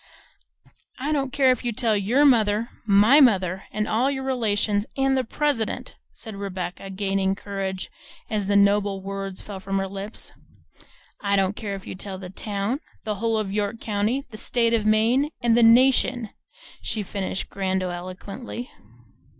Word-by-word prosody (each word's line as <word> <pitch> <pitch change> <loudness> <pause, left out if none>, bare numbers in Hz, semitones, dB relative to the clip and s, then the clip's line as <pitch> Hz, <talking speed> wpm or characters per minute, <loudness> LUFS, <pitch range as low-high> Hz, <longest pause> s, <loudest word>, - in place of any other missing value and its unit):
"I 280 +4 -2
don't 275 -3 0
care 265 -1 +4
if 255 - -1
you 240 - 0
tell 225 -1 +1
your 230 +9 +3
mother, 225 -3 +3 0.2
my 210 +8 +6
mother, 190 -7 +3
and 215 0 -1
all 245 +5 +2
your 265 -1 -3
relations, 215 -5 0
and 270 0 +2
the 260 - +1
president," 265 -2 -2 0.2
said 220 -3 -8
Rebecca, 195 -1 -5
gaining 195 0 0
courage 195 -2 -4 0.4
as 210 -3 -2
the 200 - +2
noble 200 -1 +3
words 195 -1 -5
fell 200 -2 -7
from 195 +1 -2
her 195 0 -1
lips. 200 +3 -7 0.9
"I 200 -1 +1
don't 195 0 +1
care 205 -2 -4
if 195 - -9
you - - -6
tell 190 0 -7
the 185 -1 -8
town, 205 +6 -2 0.2
the 215 - -1
whole 225 -1 +1
of 200 -3 -2
York 210 +1 -1
county, 220 +6 -1
the 215 - -8
state 230 +1 +1
of 215 -2 +1
Maine 225 +6 +4
and 240 -2 +3
and - - +3
the - - +5
nation!" 245 -2 +4 0.5
she 215 - -2
finished 195 0 -4
grandiloquently. 190 +5 -4
210 Hz, 165 wpm, -24 LUFS, 195-235 Hz, 0.9 s, my